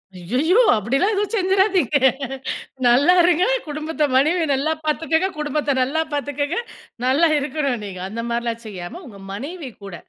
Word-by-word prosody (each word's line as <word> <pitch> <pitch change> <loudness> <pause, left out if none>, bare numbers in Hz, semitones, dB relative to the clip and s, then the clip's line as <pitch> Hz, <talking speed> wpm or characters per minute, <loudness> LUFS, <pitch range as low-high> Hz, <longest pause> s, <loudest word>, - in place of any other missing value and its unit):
அய்யய்யோ 255 - +1 0.2
அப்படிலாம் 270 - +1
எதுவும் 410 +2 -1
செஞ்சிராதீங்க. 380 -4 +2 0.9
நல்லா 275 +9 +5
இருங்க 355 +1 +3 0.2
குடும்பத்த 305 +1 -3
மனைவிய 320 +5 +3
நல்லா 285 +4 +1
பாத்துக்கங்க, 320 +3 +1
குடும்பத்த 295 -1 -1
நல்லா 290 +5 +1
பாத்துக்கங்க. 290 +2 -2 0.5
நல்லா 280 +6 +4
இருக்கணும் 275 -4 -2
நீங்க. 185 -2 -7
அந்த 230 +2 -4
மாரிலாம் 235 -1 -2
செய்யாம 190 - -7
உங்க 200 -4 -12
மனைவி 285 - -6
கூட, 195 -3 -7
290 Hz, 130 wpm, -21 LUFS, 240-335 Hz, 0.9 s, நல்லா